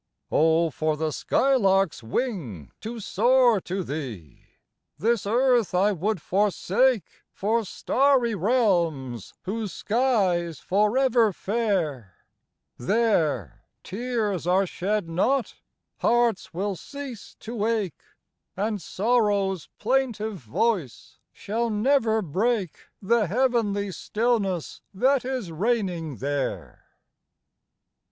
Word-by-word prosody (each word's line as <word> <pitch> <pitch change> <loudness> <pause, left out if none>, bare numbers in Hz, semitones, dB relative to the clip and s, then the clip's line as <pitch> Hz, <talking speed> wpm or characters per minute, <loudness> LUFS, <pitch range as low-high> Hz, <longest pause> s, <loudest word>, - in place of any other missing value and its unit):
Oh, 160 +1 +3
for 155 +1 -1
the 155 0 -1
sky 270 - +1
lark's 195 - +2
wing 120 - -3
to 230 +2 -6
soar 235 +1 +3
to 185 +2 -3
thee! 120 - -7 0.5
This 230 -2 0
earth 240 -3 +2
I 195 +3 +4
would 200 +2 -1
forsake 205 +6 +1 0.3
For 225 +3 0
starry 255 +3 +2
realms 170 - 0
whose 210 0 -3
sky's 195 - +1
forever 225 +3 +2
fair; 180 - -2 0.6
There, 155 - 0 0.2
tears 210 -5 -2
are 190 +2 +3
shed 195 +1 -2
not, 230 +11 0 0.5
hearts 235 -5 +1
will 195 +3 -2
cease 270 - -9
to 225 -2 -4
ache, 215 -8 -1 0.6
And 210 0 -1
sorrow's 200 -3 0
plaintive 220 -3 0
voice 150 - -2
shall 230 +3 -2
never 220 0 +2
break 195 +2 -1 0.2
The 220 0 +2
heavenly 210 -3 +1
stillness 210 -5 -1
that 260 +5 +3
is 250 -8 -3
reigning 180 - -1
there. 140 +4 -4
205 Hz, 100 wpm, -25 LUFS, 175-235 Hz, 0.6 s, I